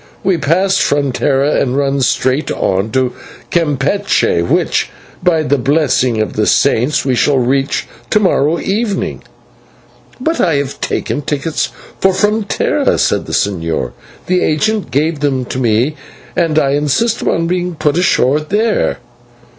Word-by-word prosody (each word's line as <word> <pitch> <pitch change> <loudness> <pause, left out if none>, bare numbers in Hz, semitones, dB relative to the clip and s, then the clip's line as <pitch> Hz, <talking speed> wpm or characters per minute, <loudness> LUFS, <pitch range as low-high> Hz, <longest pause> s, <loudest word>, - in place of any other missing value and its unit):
We 185 -3 +1
pass 185 +6 +2
Frontera 140 0 +1
and 130 0 0
run 140 -1 0
straight 130 +3 +1
on 95 +3 0
to 125 +1 0 0.4
Campeche, 155 - +1
which, 85 - 0 0.3
by 170 -3 +2
the 145 -2 +1
blessing 130 -4 +1
of 110 -3 -1
the - - 0
Saints, 130 +7 +2
we 130 - +1
shall 135 +3 +2
reach 135 +2 0 0.2
to 210 - +3
morrow 165 -5 +2
evening." 205 +2 -2 1.0
"But 325 +6 0
I 165 -4 +2
have 140 -1 -3
taken - - -2
a - - -4
ticket 150 +2 -3 0.4
for 190 0 +3
Frontera," 210 +2 +1
said - - 0
the - - -6
señor. 85 -10 -1 0.3
"The 180 0 +1
agent 215 +7 0
gave 155 +3 0
them 135 -3 0
to 130 - -4
me, 120 +5 +1 0.4
and 165 -3 +1
I 140 -3 +3
insist 150 - +1
upon 165 - 0
being 180 0 -2
put 150 -1 0
on 175 - +2
shore 145 -5 +2
there." 210 +8 0
145 Hz, 145 wpm, -15 LUFS, 130-180 Hz, 1.0 s, to